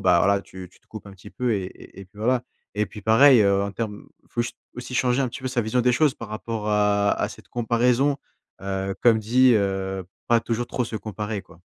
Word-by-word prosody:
bah, 85 - +4
voilà, 100 +2 +3
tu 95 -1 -11
te - - -27
coupes 110 -2 -10
un 100 - -10
petit 100 +1 -14
peu 125 -2 -1
et 100 -3 -1
et 95 - -12
et - - -9
puis, 100 +2 -21
voilà. 125 +3 +1 0.3
Et 105 0 0
puis, 105 - -11
pareil, 120 +4 +6
heu, 100 -1 +3
en 100 0 -3
terme 105 -1 -5 0.2
faut 120 - -1 0.3
aussi 125 +1 -7
changer 125 +1 +2
un 130 - 0
petit 120 - -8
peu 130 - -3
sa 125 -1 0
vision 110 +3 0
des 125 +1 +3
choses 145 +2 +3
par 115 - -9
rapport 110 0 -4
à 105 -1 +2
à - - -1
cette - - -13
comparaison. 125 +4 +1 0.4
Heu, 95 0 -3
comme 120 -2 +6
je - - -2
dis, 130 +1 +5
heu, 95 -2 -1 0.2
pas 120 -1 +4
toujours 115 +1 -2
trop 125 - -2
se 115 -1 -5
comparer 105 -1 -5
quoi. 90 - -19
110 Hz, 235 wpm, -24 LUFS, 100-120 Hz, 0.4 s, pareil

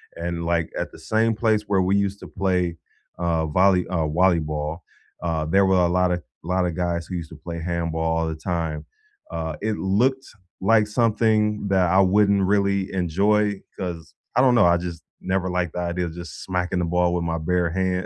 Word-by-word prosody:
and, 85 0 -4
like, 85 -1 0
at - - -3
the - - -13
same 110 +1 +1
place 110 -1 +1
where 100 -2 +2
we 95 +2 +2
used 100 0 0
to - - -8
play, 90 -3 -1 0.4
uh, 85 -2 0
volley 90 +2 +3
uh, 90 - -1
wallyball, 80 -2 0 0.4
uh, 80 -2 -1
there 95 +5 +3
were 95 0 +3
a 90 -1 +4
lotta 90 -1 +1 0.2
lotta 90 +1 0
guys 85 0 -2
who 95 - -5
used 85 -2 -5
to - - -11
play 85 +2 -7
handball 80 -1 -1
all 80 - 0
the 80 - -3
time. 80 -2 -3 0.5
Uh, 80 -1 -3
it 110 0 0
looked 125 +8 +1 0.3
like 105 +1 +4
something 105 -2 +1
that 95 -3 +2
I 95 +3 +4
wouldn't 100 +1 +4
really 100 0 +1
enjoy 100 +3 +1 0.2
'cause, 85 -4 -6 0.2
I 125 - +5
don't 125 -2 +5
know, 120 - +5
I 85 0 +5
just 85 -2 -6 0.2
never 95 0 -1
liked 90 -2 -1
the - - -4
idea 90 0 -1
of 80 - -6
just 85 -4 -8
smacking 90 0 -1
the 90 - 0
ball 90 +1 +1
with 85 - -1
my 80 0 -1
bare 85 +2 0
hand. 95 +1 -1
90 Hz, 195 wpm, -23 LUFS, 85-100 Hz, 0.5 s, I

